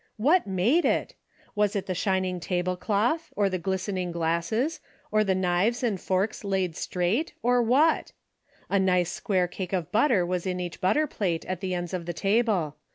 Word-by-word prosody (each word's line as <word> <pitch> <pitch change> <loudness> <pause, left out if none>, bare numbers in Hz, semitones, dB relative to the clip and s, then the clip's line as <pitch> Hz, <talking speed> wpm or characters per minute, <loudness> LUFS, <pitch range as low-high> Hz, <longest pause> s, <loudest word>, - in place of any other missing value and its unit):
What 300 - +3
made 205 - +2
it? - - 0 0.4
AYas 210 0 +1
it 200 - -1
the 185 - -2
shining 185 0 0
table 180 +1 -1
cloth, 220 - 0
or 200 -2 +1
the 185 - -1
glistening 185 0 -2
glasses, 170 - -1 0.3
or 215 0 +3
the 195 -2 +1
knives 185 +7 +1
and 210 -7 0
forks 195 +4 -1
laid 190 -4 -1
straight, 185 - -1
or 245 +1 +3
what? 275 +8 +3 0.6
A 200 - +2
nice 180 -2 +2
square 185 -3 0
cake 185 +1 -6
of 175 -4 -2
butter 220 -4 +3
was 180 +1 -2
in 180 -1 -2
each 175 -2 -5
butter 295 +12 +3
plate 185 - -2
at 185 -1 -4
the 185 -2 -2
ends 175 0 -4
of 175 -2 -4
the 175 - -2
table. 195 -5 +1
190 Hz, 180 wpm, -27 LUFS, 180-220 Hz, 0.6 s, What